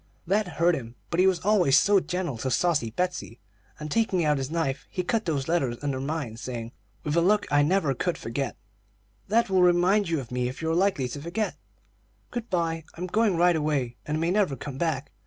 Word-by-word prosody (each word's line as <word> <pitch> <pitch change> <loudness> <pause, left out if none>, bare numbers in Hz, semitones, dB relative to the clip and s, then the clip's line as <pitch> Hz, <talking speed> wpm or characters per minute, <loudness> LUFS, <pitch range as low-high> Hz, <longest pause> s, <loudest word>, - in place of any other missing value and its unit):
"That 200 +3 +1
hurt 170 +1 +4
him; 120 -6 -5 0.2
but 170 - 0
he 185 - +6
was 180 -3 +2
always 180 -10 +5 0.3
gentle 180 -9 -2
to 130 - -2
saucy 145 -2 +1
Betsey, 180 -4 -3 0.4
and 150 0 -6
taking 190 -6 +1
out 150 -2 +2
his 135 0 -3
knife, 155 -4 -2
he 180 - -3
cut 220 +4 0
those 145 -5 -1
letters 135 -8 0
under 140 -2 -1
mine, 135 -5 -3
saying, 115 -1 -5 0.3
with 150 0 -1
a 170 - +4
look 205 +4 +3
I 145 0 +5
never 155 -2 +2
could 175 +7 -2
forget: 130 +3 -4 0.7
"'That 225 0 +2
will 190 -1 +4
remind 180 +3 +4
you 165 -2 +1
of 125 -3 -8
me 125 0 0
if 130 - -8
you 160 0 -1
are - - +1
likely 180 -8 +2
to 145 - -6
forget. 190 +7 -2 0.8
Good 240 -1 -5
by; 165 -3 -1
I'm 180 - -4
going 210 0 +2
right 175 0 +4
away, 145 -6 -1
and 150 +1 -2
may 165 +2 +1
never 190 -8 +2
come 135 +1 -7
back.' 155 -5 -1
165 Hz, 210 wpm, -26 LUFS, 135-180 Hz, 0.8 s, he